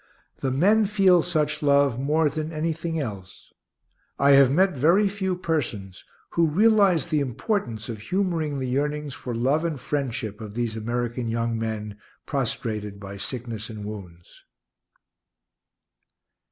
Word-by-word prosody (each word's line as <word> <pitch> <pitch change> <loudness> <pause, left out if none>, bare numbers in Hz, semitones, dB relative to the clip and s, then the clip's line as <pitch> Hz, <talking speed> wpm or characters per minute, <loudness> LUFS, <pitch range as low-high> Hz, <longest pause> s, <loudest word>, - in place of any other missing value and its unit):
The 135 - -1
men 200 +11 +3
feel 195 -4 +4
such 155 -3 -1
love 140 -4 +3
more 150 +3 +2
than 155 +1 -3
anything 165 +1 -2
else. 100 -9 -7 0.6
I 140 +1 +4
have 135 -2 +7
met 185 +5 +3
very 170 +10 +4
few 190 -2 -2
persons 120 - -3 0.3
who 170 -1 +3
realize 200 0 +4
the 155 -2 +2
importance 125 - -2
of 115 -3 -5
humoring 165 - -1
the 130 - -2
yearnings 145 +2 -1
for 125 -3 -5
love 135 +7 +1
and 160 -5 -2
friendship 120 -7 -3
of 105 -1 -8
these 120 -2 -2
American 120 +2 -2
young 115 0 -1
men, 105 -2 -4 0.3
prostrated 110 -6 -3
by 100 0 -8
sickness 115 0 -5
and 105 -2 -7
wounds. 90 -5 -10
140 Hz, 135 wpm, -25 LUFS, 115-165 Hz, 0.6 s, have